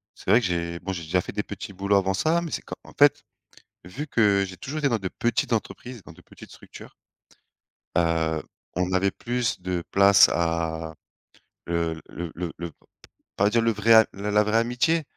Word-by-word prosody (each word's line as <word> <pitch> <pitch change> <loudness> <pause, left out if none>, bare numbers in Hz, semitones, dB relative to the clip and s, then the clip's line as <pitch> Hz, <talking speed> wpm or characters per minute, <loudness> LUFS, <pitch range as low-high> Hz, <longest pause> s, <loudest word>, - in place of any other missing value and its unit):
c'est - - -9
vrai 115 - +7
que - - -2
j'ai 85 -1 -3
bon, 95 - -4
j'ai 85 -2 -6
déjà 90 +4 0
fait - - -7
des 105 - -3
petits 100 0 -8
boulots 100 +2 +1
avant 95 0 +1
ça 160 - +1
mais 170 -2 -6
c'est - - -3
quand - - -7
en - - -15
fait, - - +4 0.6
vu 95 - -7
que 100 -6 +3
j'ai 95 0 -10
toujours 150 +9 -5
été 140 -2 +1
dans 115 - 0
de 95 -2 -4
petites 120 0 -1
entreprises, 120 +1 -4
dans - - -13
de - - -18
petites - - -15
structures - - -13 1.0
heu, 80 -2 +1 0.3
on 90 +1 -1
avait 95 +1 +2
plus 120 -1 -2
de 90 -1 -3
place 100 0 +6
à 80 -1 -1 0.7
le 85 -1 -2
le 85 -2 -6
le 85 0 -4
le 85 -1 -6
p - - -39 0.6
pas 100 +1 +3
dire 115 +2 +2
le 115 0 +2
vrai 110 +1 +5
la 105 +1 -4
la 105 +1 +4
vraie 105 +2 +1
amitié 125 +8 +1
100 Hz, 200 wpm, -25 LUFS, 85-115 Hz, 1.0 s, vrai